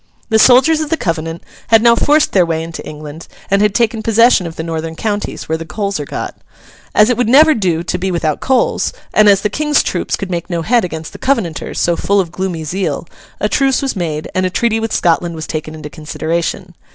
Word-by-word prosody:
The 220 -1 +3
soldiers 260 +7 +5
of 310 - -3
the 325 - 0
Covenant 165 - -3 0.2
had 225 -1 +5
now 235 -1 +6
forced 295 +5 +3
their 185 - +4
way 165 -1 -2
into 165 0 -7
England 150 +1 -9 0.2
and 200 0 +3
had 210 -1 +2
taken 230 -2 +1
possession 225 -4 +4
of 160 - -8
the 160 - -5
northern 160 0 -4
counties, 205 +2 -3
where 160 0 -1
the - - -5
coals 200 +3 -3
are 145 - -4
got. - - -5 0.6
As 215 +3 +5
it 245 - 0
would 245 -2 +1
never 310 +5 +7
do 175 - 0
to 180 - -2
be 190 +2 -1
without 165 -4 -1
coals, 260 -1 +1 0.2
and 215 -1 +5
as 195 -1 +4
the 210 - +1
King's 300 +4 +1
troops - - -2
could 195 -2 -6
make 175 +1 -3
no 170 -2 -2
head 235 +5 +2
against 160 -3 -6
the - - -10
Covenanters 225 - -1
so 170 - +2
full 200 +4 +1
of 175 -4 -1
gloomy 180 -3 -3
zeal, 185 +6 -3 0.3
a - - +1
truce 270 -1 +1
was 270 - -1
made, 155 -5 -3
and 185 - 0
a 185 - +1
treaty 225 +4 0
with 225 0 -3
Scotland 170 0 +1
was 160 0 -5
taken 155 0 -5
into 155 -1 -8
consideration. 170 +4 -3
185 Hz, 225 wpm, -15 LUFS, 165-225 Hz, 0.6 s, never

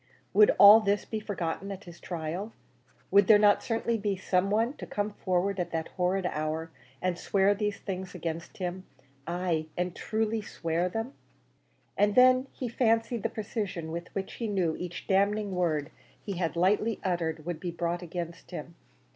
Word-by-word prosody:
Would 210 +2 +7
all 205 +2 +10
this 205 -1 0
be 220 - -3
forgotten 195 -2 -4
at 195 0 -7
his 175 -1 -12
trial? 175 +5 -4 0.6
Would 200 -1 +6
there 215 - +8
not 205 -1 +5
certainly 230 0 -1
be 200 -2 -1
some 185 0 +1
one 225 +5 +1
to - - -8
come 205 +1 -2
forward 190 0 -1
at 175 -1 -1
that 160 0 -2
horrid 185 +1 0
hour, 160 0 -2 0.3
and 180 -1 0
swear 195 0 +3
these 210 0 -2
things 190 -1 -5
against 165 -1 -5
him 185 0 -4 0.4
ay, 170 -2 -1
and 180 0 -1
truly 220 0 -1
swear 170 -2 -2
them? 225 +7 -4 0.8
And 205 0 +2
then 255 +1 +6
he 255 - -5
fancied 230 -1 +1
the - - -1
precision 200 -7 -4
with 170 +2 -5
which 195 -1 -3
he 230 - -4
knew 185 -6 0
each 180 -1 -6
damning 200 +1 +1
word 160 -4 0 0.3
he 200 - -5
had 170 -2 -1
lightly 205 +5 +2
uttered 165 -4 -1
would 175 -2 -3
be 180 - -4
brought 170 +1 -2
against 170 -1 -6
him. - - -7
190 Hz, 170 wpm, -29 LUFS, 170-210 Hz, 0.8 s, all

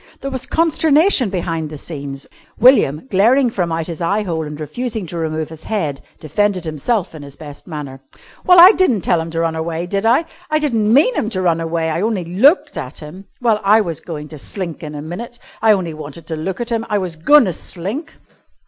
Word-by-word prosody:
There 275 - -4
was 260 -1 -4
consternation 320 - +3
behind 165 -4 -3
the 155 - -8
scenes. 140 -2 -7 0.3
William, 235 - +4
glaring 235 +6 +4
from 175 -6 -2
out 165 0 -2
his 170 -1 -7
eye 200 +5 0
hole 165 -5 -3
and 150 0 -8
refusing 220 - -4
to 170 +1 -7
remove 160 -1 -3
his 160 -1 -11
head, 160 -11 -2 0.2
defended 185 +4 -1
himself 170 - -1
in 155 - -9
his 140 -1 -10
best 145 -2 -11
manner. 145 -5 -7 0.4
"Well 360 -1 +6
I 360 +3 +11
di'n't 265 - +1
tell 170 - +2
him 165 - -6
to 165 0 -2
run 165 -1 -1
away, 165 +1 -3
did 195 +3 -2
I? 255 +8 +3 0.2
I 310 - +2
di'n't 300 -4 -1 0.2
mean 290 - +5
him 220 - -1
to 185 -4 -3
run 165 -2 +1
away. 165 0 -1
I 165 - -1
only 210 -4 -1
looked 275 - +3
at 130 -3 -7
him. 165 +6 -10 0.2
Well, 225 -3 +2
I 210 +3 +5
was 170 -6 -4
goin' 150 -3 -7
to 155 - -9
slink 175 +1 -4
in 150 -2 -7
a 145 - -6
minit. 230 +10 -7 0.2
I 220 0 +5
only 185 -6 0
wanted 155 +1 -9
to 160 - -2
look 175 +4 -4
at 240 0 -4
him. 230 -1 0
I 210 - +1
was 180 -4 -3
goin' 270 - +5
to 185 - -2
slink." 200 - -5
175 Hz, 220 wpm, -18 LUFS, 160-230 Hz, 0.4 s, I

